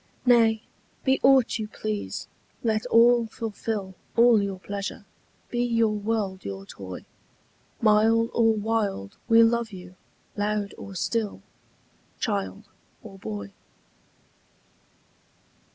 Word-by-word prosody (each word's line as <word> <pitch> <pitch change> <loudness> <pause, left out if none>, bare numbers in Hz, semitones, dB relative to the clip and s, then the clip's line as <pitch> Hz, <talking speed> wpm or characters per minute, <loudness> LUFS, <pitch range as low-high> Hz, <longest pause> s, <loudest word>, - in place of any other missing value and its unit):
Nay, 225 -2 +4 0.4
be 265 0 +2
aught 265 -4 +4
you 215 - -3
please, 215 -1 -4 0.4
let 220 -2 0
all 235 0 +5
fulfil 215 -3 -4 0.2
All 235 -2 +6
your 200 -1 -3
pleasure; 200 +1 -6 0.5
be 240 0 0
your 230 -2 +2
world 205 -2 -2
your 95 0 -6
toy: 95 -2 -9 0.8
Mild 225 +2 +4
or 225 -1 +4
wild 205 - -2
we 230 0 +7
love 230 0 +1
you, 180 -1 -11 0.4
loud 205 -1 -1
or 195 - -9
still, 215 +2 -2 0.8
Child 205 -1 -2 0.4
or 195 -4 -11
boy. 100 - -6
215 Hz, 105 wpm, -26 LUFS, 200-230 Hz, 0.8 s, we